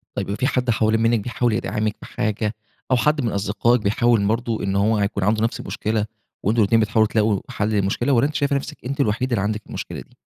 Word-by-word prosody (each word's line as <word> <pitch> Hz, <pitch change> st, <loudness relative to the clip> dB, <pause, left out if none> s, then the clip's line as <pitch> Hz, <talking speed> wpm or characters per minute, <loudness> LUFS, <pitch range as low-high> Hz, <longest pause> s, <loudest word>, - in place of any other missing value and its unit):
طيب، 100 Hz, -, -2 dB
في 130 Hz, -, +2 dB
حد 125 Hz, -3 st, 0 dB
حوالين 110 Hz, 0 st, +2 dB
منِّك 115 Hz, 0 st, +3 dB
بيحاول 120 Hz, +2 st, -1 dB
يدعمِك 105 Hz, 0 st, -1 dB
بحاجة، 105 Hz, +1 st, -2 dB, 0.4 s
أو -, -, +6 dB
حد 150 Hz, +5 st, +2 dB
من 115 Hz, -4 st, -1 dB
أصدقائِك 105 Hz, +4 st, +1 dB
بيحاول 110 Hz, +1 st, +2 dB
برضو 115 Hz, +1 st, -1 dB
إن 100 Hz, 0 st, -1 dB
هو 105 Hz, +3 st, +2 dB
هيكون 100 Hz, -1 st, -1 dB
عنده 110 Hz, +3 st, +2 dB
نَفس 115 Hz, -, -1 dB
المشكلة، 110 Hz, -1 st, -2 dB, 0.4 s
وأنتم 110 Hz, +3 st, +2 dB
الاتنين 110 Hz, +2 st, +4 dB
بتحاولوا 110 Hz, 0 st, +3 dB
تلاقوا 105 Hz, -2 st, +1 dB
حل 105 Hz, +1 st, -1 dB
للمشكلة؟ 105 Hz, +5 st, +1 dB
والّا 130 Hz, +3 st, +4 dB
أنتِ 150 Hz, -, -8 dB
شايفة 140 Hz, 0 st, +1 dB
نفسِك 140 Hz, -, -4 dB
أنتِ 140 Hz, +3 st, -4 dB
الوحيدة 120 Hz, +2 st, 0 dB
اللي 105 Hz, -, +1 dB
عندِك 105 Hz, +1 st, -1 dB
المشكلة -, -, -6 dB
دي؟ -, -, -19 dB
110 Hz, 210 wpm, -22 LUFS, 105-120 Hz, 0.4 s, أو